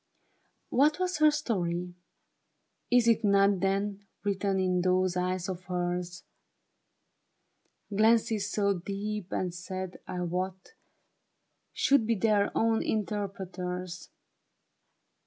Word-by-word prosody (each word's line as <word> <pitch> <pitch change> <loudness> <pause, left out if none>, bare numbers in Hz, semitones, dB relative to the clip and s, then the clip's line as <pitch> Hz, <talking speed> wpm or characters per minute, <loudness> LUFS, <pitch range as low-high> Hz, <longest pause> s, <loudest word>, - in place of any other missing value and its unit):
What 295 +4 +4
was 365 -2 0
her 310 0 +7
story? 180 - -2 1.0
Is 245 -1 +5
it 230 0 +4
not 200 -1 +4
Then, 200 +1 -1 0.2
written 195 -1 0
in 180 -1 +1
those 185 0 +2
eyes 180 0 -1
of 185 -1 -5
hers? 175 -1 -3 1.7
Glances 220 -1 +3
so 200 -3 +1
deep 200 +1 -4
and 180 -2 -1
sad, 185 +1 -6
I 180 - -4
wot, 185 +2 -3 1.0
Should 270 -6 +3
be 230 - +2
their 205 -1 +2
own 225 0 +2
interpreters. 185 -4 -3
195 Hz, 100 wpm, -29 LUFS, 180-215 Hz, 1.7 s, her